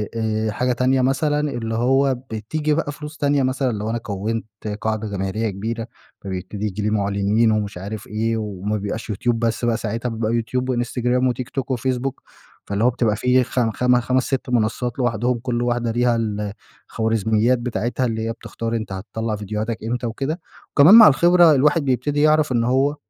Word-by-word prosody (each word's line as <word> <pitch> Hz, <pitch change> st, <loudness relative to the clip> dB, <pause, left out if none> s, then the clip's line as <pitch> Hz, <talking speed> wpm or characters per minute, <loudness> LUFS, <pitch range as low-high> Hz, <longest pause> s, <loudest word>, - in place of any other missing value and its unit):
آآ، 110 Hz, -1 st, -1 dB
حاجة 125 Hz, +3 st, 0 dB
تانية 130 Hz, +1 st, +2 dB
مثلًا 145 Hz, +3 st, +1 dB
اللي 120 Hz, -7 st, -2 dB
هو 135 Hz, +3 st, +2 dB, 0.2 s
بتيجي 150 Hz, +8 st, -1 dB
بقى 150 Hz, -1 st, -1 dB
فلوس 150 Hz, +2 st, -9 dB
تانية 145 Hz, -2 st, +2 dB
مثلًا 130 Hz, 0 st, 0 dB
لو 105 Hz, 0 st, -3 dB
أنا 115 Hz, -, -1 dB
كَوِّنت 110 Hz, 0 st, -3 dB, 0.4 s
قاعدة 110 Hz, 0 st, -1 dB
جماهيرية 100 Hz, +2 st, -2 dB
كبيرة، 110 Hz, +4 st, -4 dB, 0.3 s
فبيبتدي 95 Hz, +2 st, -5 dB
ييجي 105 Hz, 0 st, -3 dB
لي 105 Hz, -, 0 dB
مُعْلِنين 100 Hz, +2 st, +2 dB
ومش 105 Hz, -3 st, -1 dB
عارف 100 Hz, +4 st, -6 dB
إيه، 115 Hz, +2 st, -1 dB
وما 105 Hz, -1 st, -3 dB
بيبقاش 105 Hz, +3 st, -5 dB
يوتيوب 115 Hz, +3 st, 0 dB
بس 115 Hz, +1 st, 0 dB
بقى 115 Hz, -1 st, +1 dB
ساعتها، 115 Hz, +2 st, -3 dB
بيبقى 110 Hz, -1 st, -2 dB
يوتيوب 125 Hz, +2 st, -1 dB
وانستجرام 125 Hz, +1 st, 0 dB
وتيك 125 Hz, +1 st, -3 dB
توك 135 Hz, -1 st, -4 dB
وفيسبوك، 130 Hz, +1 st, -2 dB, 0.4 s
فاللي 100 Hz, +2 st, -1 dB
هو 125 Hz, -, +5 dB
بتبقى 115 Hz, -3 st, 0 dB
فيه 125 Hz, +3 st, +3 dB
خم 120 Hz, -2 st, 0 dB
خم 125 Hz, +2 st, +2 dB
خمس، 130 Hz, +2 st, +1 dB
6 135 Hz, 0 st, -2 dB
منصات 120 Hz, +1 st, -1 dB
لوحدهم، 120 Hz, 0 st, 0 dB
كُلّ 120 Hz, 0 st, -2 dB
واحدة 120 Hz, -1 st, 0 dB
ليها 120 Hz, 0 st, +2 dB, 0.7 s
الخوارزميّات 110 Hz, +2 st, +1 dB
بتاعتها 120 Hz, +1 st, -2 dB
اللي 110 Hz, -2 st, -2 dB
هي -, -, -1 dB
بتختار 115 Hz, 0 st, -5 dB
أنت 110 Hz, -3 st, -4 dB
هتطَلّع 110 Hz, +4 st, -4 dB
فيديوهاتك 105 Hz, +2 st, -3 dB
إمتى 120 Hz, +2 st, -2 dB
وكده، 135 Hz, +8 st, -3 dB, 0.3 s
وكمان 155 Hz, +9 st, +8 dB
مع 230 Hz, -2 st, +11 dB
الخبرة 175 Hz, +3 st, +6 dB
الواحد 150 Hz, +2 st, +3 dB
بيبتدي 145 Hz, +3 st, 0 dB
يعرف 155 Hz, -1 st, +3 dB
إن 120 Hz, -2 st, +2 dB
هو 135 Hz, +4 st, +2 dB
120 Hz, 175 wpm, -21 LUFS, 110-130 Hz, 0.7 s, مع